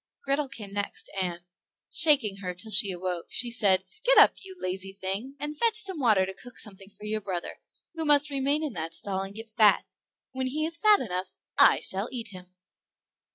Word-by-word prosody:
Grethel 275 Hz, 0 st, 0 dB
came 205 Hz, -5 st, -8 dB
next, 205 Hz, 0 st, -3 dB
and, 175 Hz, -2 st, -3 dB, 0.5 s
shaking 265 Hz, -11 st, +4 dB
her 180 Hz, -2 st, -6 dB
till 215 Hz, +5 st, -7 dB
she 205 Hz, 0 st, +6 dB
awoke, 180 Hz, -1 st, -5 dB
she 240 Hz, 0 st, +1 dB
said, 195 Hz, -6 st, +3 dB, 0.2 s
"Get -, -, +4 dB
up, -, -, +8 dB
you 380 Hz, -1 st, -10 dB
lazy 190 Hz, -, -4 dB
thing, 195 Hz, +8 st, -5 dB
and 295 Hz, +1 st, -4 dB
fetch 450 Hz, +7 st, +3 dB
some 390 Hz, -6 st, +2 dB
water 215 Hz, -8 st, +3 dB
to 190 Hz, -, -7 dB
cook 245 Hz, +5 st, -14 dB
something 195 Hz, -2 st, -9 dB
good 200 Hz, -, -18 dB
for 210 Hz, -, -12 dB
your 215 Hz, 0 st, -3 dB
brother, 185 Hz, -4 st, -5 dB, 0.3 s
who 325 Hz, -1 st, -4 dB
must 295 Hz, -1 st, +3 dB
remain 280 Hz, +3 st, 0 dB
in 295 Hz, -5 st, -3 dB
that 165 Hz, -1 st, -4 dB
stall 190 Hz, +2 st, -1 dB
and 195 Hz, +1 st, -8 dB
get 225 Hz, +1 st, -8 dB
fat; 215 Hz, -2 st, +3 dB, 0.5 s
when 260 Hz, -1 st, -3 dB
he 305 Hz, +4 st, -2 dB
is 335 Hz, +1 st, 0 dB
fat 425 Hz, -1 st, +5 dB
enough 185 Hz, -5 st, -5 dB, 0.2 s
I -, -, +6 dB
shall, 195 Hz, +4 st, -1 dB
eat 235 Hz, -3 st, -6 dB
him." 185 Hz, -2 st, -12 dB
215 Hz, 200 wpm, -27 LUFS, 190-280 Hz, 0.5 s, up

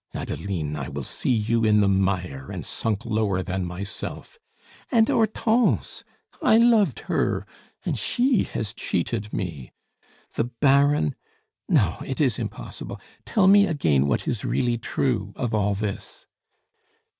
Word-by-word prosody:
Adeline! 80 Hz, -7 st, -3 dB
I 70 Hz, -2 st, -4 dB
will 70 Hz, -1 st, -5 dB
see -, -, -3 dB
you 115 Hz, -1 st, +2 dB
in 105 Hz, -1 st, +4 dB
the 100 Hz, -, +4 dB
mire, 90 Hz, -8 st, 0 dB
and -, -, -5 dB
sunk 110 Hz, +1 st, -2 dB
lower 105 Hz, -5 st, 0 dB
than 95 Hz, 0 st, -2 dB
myself! 100 Hz, -, -6 dB, 0.5 s
And 225 Hz, -3 st, +4 dB
Hortense 225 Hz, +1 st, +1 dB, 0.4 s
I 220 Hz, -, +5 dB
loved 225 Hz, -, +4 dB
her, -, -, -1 dB, 0.4 s
and -, -, -1 dB
she 250 Hz, -1 st, +2 dB
has 105 Hz, -2 st, -4 dB
cheated 105 Hz, +4 st, -2 dB
me. 80 Hz, -9 st, -5 dB, 0.6 s
The 115 Hz, -, 0 dB
Baron. 135 Hz, -, +3 dB, 0.6 s
No, -, -, +2 dB
it -, -, -5 dB
is -, -, +2 dB
impossible. -, -, -6 dB, 0.3 s
Tell 210 Hz, -4 st, +2 dB
me 200 Hz, +1 st, +7 dB
again 75 Hz, -, +2 dB
what 70 Hz, -, -1 dB
is 110 Hz, -, -2 dB
really 120 Hz, -2 st, 0 dB
true 115 Hz, -5 st, -1 dB
of 120 Hz, -2 st, -3 dB
all 105 Hz, -1 st, +1 dB
this." 100 Hz, -1 st, -5 dB
110 Hz, 135 wpm, -24 LUFS, 95-140 Hz, 0.6 s, me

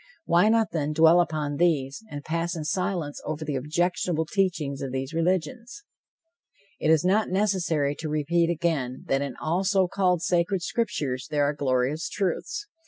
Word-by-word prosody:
Why 175 Hz, +5 st, +4 dB
not, 225 Hz, -1 st, +2 dB
then, 155 Hz, -2 st, -1 dB
dwell 165 Hz, +2 st, +6 dB
upon 150 Hz, -4 st, -2 dB
these, 150 Hz, -1 st, +1 dB
and 145 Hz, -4 st, -7 dB
pass 170 Hz, +2 st, -2 dB
in 155 Hz, -2 st, -5 dB
silence 180 Hz, -4 st, -2 dB
over 155 Hz, 0 st, -4 dB
the 145 Hz, -1 st, -2 dB
objectionable 160 Hz, +3 st, 0 dB
teachings 165 Hz, -7 st, -1 dB
of 135 Hz, -, -4 dB
these 135 Hz, +3 st, -4 dB
religions? 190 Hz, -, -2 dB, 1.0 s
It 155 Hz, -, 0 dB
is 160 Hz, +1 st, +4 dB
not 205 Hz, +4 st, +2 dB
necessary 180 Hz, -7 st, +1 dB
to 155 Hz, -, -4 dB
repeat 165 Hz, +3 st, +1 dB
again 160 Hz, -7 st, -1 dB
that 135 Hz, 0 st, +2 dB
in 140 Hz, -3 st, -4 dB
all 170 Hz, +5 st, 0 dB
so 190 Hz, -1 st, +2 dB
called 180 Hz, -2 st, +1 dB
sacred 175 Hz, +1 st, +1 dB
scriptures, 145 Hz, -, -2 dB
there 145 Hz, -1 st, +1 dB
are 145 Hz, +1 st, +1 dB
glorious 140 Hz, +5 st, 0 dB
truths. 200 Hz, -, -2 dB
165 Hz, 165 wpm, -26 LUFS, 145-185 Hz, 1.0 s, dwell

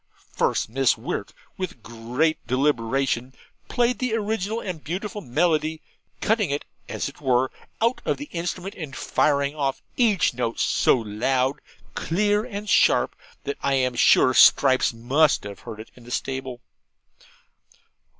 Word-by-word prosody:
First -, -, 0 dB
Miss 130 Hz, +2 st, +2 dB
Wirt, -, -, -4 dB, 0.3 s
with 175 Hz, -, -5 dB
great 120 Hz, +9 st, -1 dB
deliberation, 130 Hz, -1 st, 0 dB, 0.3 s
played 245 Hz, 0 st, +1 dB
the 250 Hz, -3 st, 0 dB
original 220 Hz, 0 st, -2 dB
and 180 Hz, -8 st, -6 dB
beautiful 200 Hz, +6 st, -4 dB
melody, 155 Hz, +3 st, 0 dB, 0.4 s
cutting 215 Hz, -5 st, +1 dB
it, 145 Hz, +1 st, -2 dB, 0.2 s
as -, -, -3 dB
it -, -, -11 dB
were, 130 Hz, -1 st, +2 dB, 0.3 s
out 235 Hz, +3 st, +1 dB
of -, -, 0 dB
the 290 Hz, -, -6 dB
instrument, 180 Hz, +3 st, -4 dB
and 150 Hz, -6 st, -8 dB
firing 140 Hz, -1 st, +1 dB
off 140 Hz, -3 st, -2 dB
each 215 Hz, -, +3 dB
note 120 Hz, -1 st, -3 dB
so -, -, +3 dB
loud, 125 Hz, +5 st, -1 dB, 0.3 s
clear, 205 Hz, +5 st, +1 dB
and 210 Hz, -3 st, -6 dB
sharp, -, -, +3 dB, 0.3 s
that 140 Hz, -, -4 dB
I 140 Hz, -, +1 dB
am 130 Hz, -1 st, +1 dB
sure 130 Hz, +1 st, +5 dB
Stripes 130 Hz, +1 st, +5 dB
must 130 Hz, +6 st, +2 dB
have 100 Hz, -1 st, -8 dB
heard 110 Hz, -3 st, -9 dB
it 110 Hz, -, -10 dB
in 125 Hz, -, -16 dB
the 120 Hz, -, -13 dB
stable. 130 Hz, -1 st, -4 dB
140 Hz, 140 wpm, -24 LUFS, 125-190 Hz, 0.4 s, sure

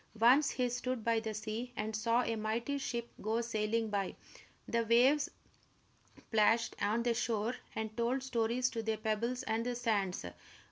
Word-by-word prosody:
Once 260 Hz, +6 st, +6 dB
he 250 Hz, -1 st, 0 dB
stood 245 Hz, -1 st, -2 dB
by 230 Hz, 0 st, +2 dB
the 220 Hz, 0 st, -4 dB
sea 220 Hz, +3 st, -4 dB
and 215 Hz, +1 st, -2 dB
saw 230 Hz, +3 st, +2 dB
a 230 Hz, -, -1 dB
mighty 230 Hz, +6 st, -1 dB
ship 235 Hz, -3 st, -3 dB
go 220 Hz, +2 st, 0 dB
sailing 225 Hz, -1 st, 0 dB
by. 200 Hz, -2 st, -1 dB, 0.5 s
The 235 Hz, 0 st, +1 dB
waves 250 Hz, +6 st, +4 dB, 1.0 s
plashed 225 Hz, +1 st, +3 dB
on 215 Hz, +3 st, +1 dB
the 240 Hz, -1 st, +2 dB
shore 230 Hz, -1 st, 0 dB, 0.2 s
and 220 Hz, 0 st, -3 dB
told 245 Hz, +3 st, 0 dB
stories 245 Hz, 0 st, +1 dB
to 230 Hz, -, -2 dB
the 220 Hz, 0 st, -1 dB
pebbles 225 Hz, +3 st, -1 dB
and 225 Hz, +1 st, -1 dB
the 245 Hz, 0 st, -2 dB
sands. 205 Hz, -, 0 dB
230 Hz, 160 wpm, -34 LUFS, 220-245 Hz, 1.0 s, Once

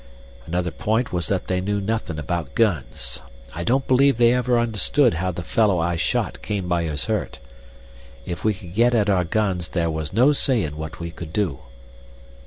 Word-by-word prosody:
Another 90 Hz, +1 st, -1 dB
point 110 Hz, +5 st, -1 dB
was 85 Hz, -1 st, -1 dB
that 95 Hz, -2 st, -1 dB
they 90 Hz, 0 st, -1 dB
knew 100 Hz, +2 st, -1 dB
nothin' 100 Hz, -5 st, -2 dB
about 75 Hz, -2 st, -3 dB
guns. 75 Hz, -, -1 dB, 0.3 s
I 85 Hz, -, -4 dB
don't 130 Hz, +7 st, +1 dB
believe 135 Hz, 0 st, +4 dB
they 120 Hz, 0 st, +5 dB
ever 125 Hz, -1 st, +2 dB
understood 120 Hz, +3 st, +2 dB
how 90 Hz, +3 st, -1 dB
the 90 Hz, 0 st, -6 dB
fellow 100 Hz, +2 st, +2 dB
I 85 Hz, +1 st, 0 dB
shot 80 Hz, -, -1 dB
came 100 Hz, -4 st, -3 dB
by 85 Hz, -1 st, 0 dB
his 75 Hz, -3 st, -3 dB
hurt. -, -, -2 dB, 0.9 s
If 85 Hz, -, -5 dB
we 110 Hz, -1 st, +2 dB
could 90 Hz, -3 st, -11 dB
get 120 Hz, +4 st, +3 dB
at 105 Hz, -2 st, +3 dB
our 90 Hz, -2 st, +2 dB
guns 95 Hz, -2 st, 0 dB
there 85 Hz, -2 st, 0 dB
was 80 Hz, -2 st, -3 dB
no 130 Hz, +6 st, +5 dB
sayin' 115 Hz, -, +1 dB
what 80 Hz, 0 st, -7 dB
we 85 Hz, 0 st, -5 dB
could 85 Hz, -2 st, -9 dB
do. 90 Hz, -8 st, -1 dB
95 Hz, 190 wpm, -23 LUFS, 85-115 Hz, 0.9 s, they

